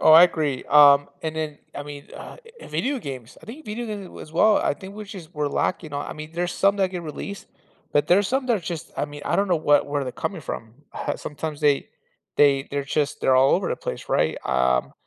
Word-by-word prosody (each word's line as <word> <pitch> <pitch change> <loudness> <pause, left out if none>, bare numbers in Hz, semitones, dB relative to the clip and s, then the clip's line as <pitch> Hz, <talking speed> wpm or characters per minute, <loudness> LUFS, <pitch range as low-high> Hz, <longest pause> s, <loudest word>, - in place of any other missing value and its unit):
Oh, 155 - +7
I 165 +2 +10
agree, 150 -7 +1
um, 145 -1 +7
and 160 -1 -3
then, 155 -2 -3 0.2
I 145 - -5
mean, 145 -1 -9
uh, - - -9 0.2
eh, - - -10
video 275 0 -1
games, 130 - -8
I - - -14
think 280 +8 -9
video 230 +3 -4
gaming, 205 -4 -7
as 155 - -11
well. 210 +5 +5
I - - +1
think 195 +1 -11
we're 215 - -7
just 185 -5 -10
we're 150 -1 0
lacking 155 0 -1
on 145 0 -3
I - - -5
mean, 155 0 -8
there's 175 +1 -2
some 200 +2 +3
that 190 -2 +1
get 180 -2 -5
released, 170 +6 -7 0.5
but 145 0 +3
there's 195 +2 +4
some 260 +2 0
that 235 -3 +3
are - - -5
just 165 -1 -6
I - - 0
mean, 145 0 -9
I - - 0
don't 200 0 +1
know 175 - +3
what 145 -2 +3
where 145 0 -1
they're 125 - -5
coming 180 +6 -4
from, 115 -5 -6 0.4
sometimes 150 0 -6
they 145 -2 +2 0.5
they 140 -1 +4
they're 140 -1 -2
just 145 +1 -1
they're 130 - +3
all 135 +1 +5
over - - 0
the - - -1
place, - - -6
right? - - +2
Um, 65 -1 +1
155 Hz, 240 wpm, -24 LUFS, 145-190 Hz, 0.5 s, I